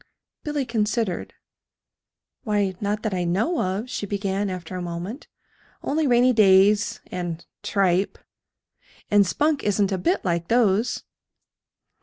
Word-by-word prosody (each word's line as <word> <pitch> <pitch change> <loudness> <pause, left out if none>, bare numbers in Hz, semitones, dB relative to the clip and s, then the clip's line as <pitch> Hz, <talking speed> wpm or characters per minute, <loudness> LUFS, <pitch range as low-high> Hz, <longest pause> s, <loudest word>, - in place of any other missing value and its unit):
Billy 295 -2 -2
considered. 220 -4 -1 1.1
"Why, 205 -4 0
not 210 +1 -1
that 215 -3 -1
I 180 -1 -1
know 205 - 0
of," 190 +5 -2
she 205 -4 -4
began, 200 0 -1
after 185 -1 -6
a 180 - -3
moment, 175 - -6 0.6
"only 305 +1 0
rainy 250 0 +4
days 205 0 +4
and 175 -2 -4 0.2
tripe. 195 -1 +1 0.9
And 205 -2 +5
Spunk 295 - +1
isn't 205 -1 +1
a 190 - -1
bit 350 - 0
like 170 -1 0
those." 225 -1 +2
205 Hz, 125 wpm, -24 LUFS, 185-230 Hz, 1.1 s, And